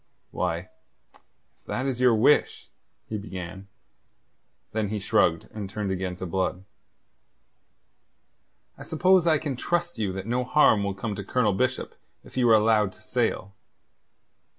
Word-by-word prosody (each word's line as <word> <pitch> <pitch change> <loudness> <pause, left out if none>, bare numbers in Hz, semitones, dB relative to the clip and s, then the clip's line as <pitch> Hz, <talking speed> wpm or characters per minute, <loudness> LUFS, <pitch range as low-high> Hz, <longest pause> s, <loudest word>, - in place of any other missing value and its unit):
"Why, 85 +2 -2 0.9
if - - -40
that 130 - -2
is 130 -2 -2
your 125 -2 +5
wish..." 125 +7 +2 0.4
he 110 - -4
began. 95 -1 -8 1.0
Then 110 -2 -1
he 105 - -2
shrugged, 90 -4 +1
and 105 -3 -5
turned 100 -1 -3
again 95 -1 -3
to 90 - -6
Blood. 95 +1 -2 2.2
"I - - -11
suppose 180 +2 +3
I 160 -1 +5
can 145 -2 -3
trust 175 +3 -2
you 100 -3 0
that 95 0 -5
no 120 +3 0
harm 125 -5 +4
will 100 -1 -2
come 105 +2 -4
to 100 - -5
Colonel 105 0 +1
Bishop 130 +6 -1 0.3
if - - -16
you 125 -2 +3
are 110 - +8
allowed 105 -2 +3
to - - -20
sail?" 100 +1 -1
105 Hz, 150 wpm, -26 LUFS, 95-125 Hz, 2.2 s, are